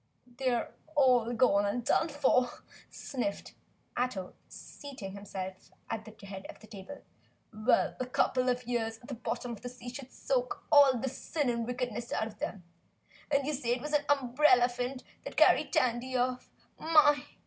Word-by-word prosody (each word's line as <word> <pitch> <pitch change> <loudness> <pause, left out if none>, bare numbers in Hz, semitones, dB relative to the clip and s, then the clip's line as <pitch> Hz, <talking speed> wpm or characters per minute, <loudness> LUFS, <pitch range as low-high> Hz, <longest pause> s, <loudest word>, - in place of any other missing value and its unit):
"Then 245 -1 -23
they're 255 -3 0 0.2
all 250 -4 +4
gone 205 -5 +3
and 235 +3 -2
done 320 - +2
for," 265 -4 +3 0.4
sniffed 240 -7 -4 0.4
Ato, 240 -7 -2
seating 260 -10 -9
himself 190 -1 -7 0.2
at 220 -2 -3
the 220 -2 -13
head 195 -1 -8
of - - -10
the - - -14
table. 215 +6 -10 0.5
"Well, 215 +4 +2
a 255 - -2
couple 255 0 +1
of 250 0 0
hundred - - -22
years 225 -2 -1
at 240 - -16
the - - -4
bottom 245 0 -4
of 225 - -7
the 245 - -5
sea 245 0 -9
should 270 -1 -8
soak - - -2
all 280 -3 +7
the 255 +3 -2
sin 270 +1 -1
and 235 -1 -2
wickedness 245 -2 -3
out 220 - 0
of 215 -1 -10
'em! 195 -4 -4 0.7
And 280 -2 +2
you 300 - -1
say 245 -4 0
it 245 - -7
was 300 +1 -5
an 290 0 +2
umbrellaphant 250 -2 +3 0.2
that - - -8
carried - - +5
Tandy 255 +1 +1
off? 250 0 -1 0.3
My! 305 -2 +5
245 Hz, 175 wpm, -31 LUFS, 225-270 Hz, 0.7 s, all